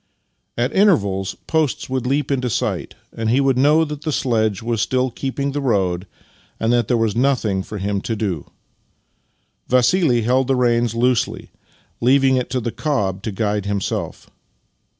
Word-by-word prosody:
At 120 Hz, +1 st, 0 dB
intervals 100 Hz, -, +2 dB
posts 160 Hz, -4 st, 0 dB
would 130 Hz, -1 st, -2 dB
leap 140 Hz, +1 st, 0 dB
into 125 Hz, -2 st, 0 dB
sight, 105 Hz, -, -2 dB, 0.2 s
and 115 Hz, -1 st, -2 dB
he 125 Hz, +4 st, +3 dB
would 135 Hz, -1 st, +2 dB
know 150 Hz, +5 st, +4 dB
that 150 Hz, -1 st, -6 dB
the 155 Hz, -, -2 dB
sledge 110 Hz, -7 st, 0 dB
was 115 Hz, -2 st, -1 dB
still 130 Hz, +1 st, 0 dB
keeping 140 Hz, +3 st, -3 dB
the 145 Hz, +1 st, -3 dB
road 95 Hz, -7 st, 0 dB, 0.5 s
and 115 Hz, +1 st, +1 dB
that 120 Hz, -3 st, +2 dB
there 120 Hz, -, +2 dB
was 115 Hz, -3 st, 0 dB
nothing 120 Hz, -6 st, +1 dB
for 105 Hz, +2 st, -7 dB
him 100 Hz, 0 st, -2 dB
to 115 Hz, -, -3 dB
do. 95 Hz, -9 st, -3 dB, 1.2 s
Vassili 125 Hz, 0 st, +3 dB
held 130 Hz, +3 st, +2 dB
the 135 Hz, -, +2 dB
reins 120 Hz, -2 st, +1 dB
loosely, 125 Hz, 0 st, 0 dB, 0.5 s
leaving 130 Hz, +2 st, +4 dB
it 125 Hz, -1 st, -1 dB
to 130 Hz, +1 st, -1 dB
the 120 Hz, -1 st, -3 dB
cob 105 Hz, -, -1 dB
to 110 Hz, -, -4 dB
guide 105 Hz, 0 st, -1 dB
himself. 100 Hz, -2 st, -3 dB
120 Hz, 165 wpm, -20 LUFS, 105-135 Hz, 1.2 s, know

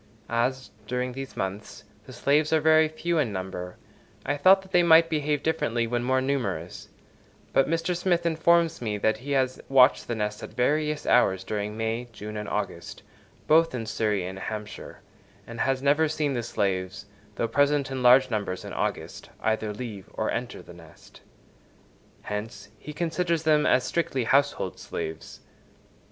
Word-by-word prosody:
As, 125 Hz, +3 st, -1 dB, 0.2 s
during 125 Hz, +1 st, -2 dB
these 135 Hz, +1 st, -8 dB
months, 95 Hz, +2 st, -5 dB, 0.2 s
the -, -, -10 dB
slaves 150 Hz, +2 st, +1 dB
are 160 Hz, -, +4 dB
very 155 Hz, 0 st, +5 dB
few 165 Hz, +2 st, -2 dB
in 130 Hz, -8 st, 0 dB
number, 95 Hz, -2 st, -6 dB, 0.5 s
I 145 Hz, -, 0 dB
thought 190 Hz, +6 st, +5 dB
that 190 Hz, -, -17 dB
they 180 Hz, -, +5 dB
might 165 Hz, -1 st, +6 dB
behave 150 Hz, -2 st, 0 dB
differently 120 Hz, -7 st, 0 dB
when 120 Hz, +1 st, -2 dB
more 130 Hz, +1 st, +1 dB
numerous; 95 Hz, -, -3 dB, 0.6 s
but 135 Hz, -, +3 dB
Mr. 165 Hz, +2 st, 0 dB
Smith 175 Hz, -1 st, 0 dB
informs 165 Hz, 0 st, +2 dB
me 105 Hz, -3 st, -2 dB
that 110 Hz, +1 st, +1 dB
he 140 Hz, +5 st, -5 dB
has 130 Hz, -1 st, 0 dB
watched 135 Hz, 0 st, +5 dB
the 120 Hz, -, -2 dB
nests 105 Hz, -1 st, -3 dB
at -, -, -9 dB
various 150 Hz, +4 st, 0 dB
hours 95 Hz, 0 st, +3 dB
during 105 Hz, +1 st, -4 dB
May, 115 Hz, +2 st, -2 dB
June 105 Hz, -1 st, -8 dB
and 105 Hz, -1 st, -5 dB
August, -, -, -5 dB, 0.4 s
both 165 Hz, -2 st, +4 dB
in 115 Hz, -2 st, -4 dB
Surrey 110 Hz, -3 st, -1 dB
and 95 Hz, +1 st, -6 dB
Hampshire, 105 Hz, +1 st, -7 dB, 0.4 s
and 115 Hz, 0 st, -9 dB
has 135 Hz, 0 st, 0 dB
never 145 Hz, +3 st, +3 dB
seen 150 Hz, -2 st, -1 dB
the 120 Hz, -, -1 dB
slaves, 95 Hz, -5 st, -2 dB, 0.3 s
though 115 Hz, -, -1 dB
present 145 Hz, +2 st, +1 dB
in 130 Hz, -1 st, -3 dB
large 125 Hz, +1 st, +6 dB
numbers 100 Hz, -4 st, -3 dB
in -, -, -7 dB
August, -, -, -4 dB
either 110 Hz, -1 st, -1 dB
leave 105 Hz, -3 st, -7 dB
or 110 Hz, -, -1 dB
enter 120 Hz, +1 st, -4 dB
the -, -, -13 dB
nest. 85 Hz, -3 st, -17 dB, 1.0 s
Hence, 105 Hz, -1 st, -6 dB
he 150 Hz, -, -8 dB
considers 170 Hz, +1 st, -1 dB
them 150 Hz, -1 st, +3 dB
as 130 Hz, -, +3 dB
strictly 135 Hz, -7 st, -1 dB
household 140 Hz, +5 st, +1 dB
slaves. 80 Hz, 0 st, -7 dB
125 Hz, 165 wpm, -26 LUFS, 105-150 Hz, 1.0 s, might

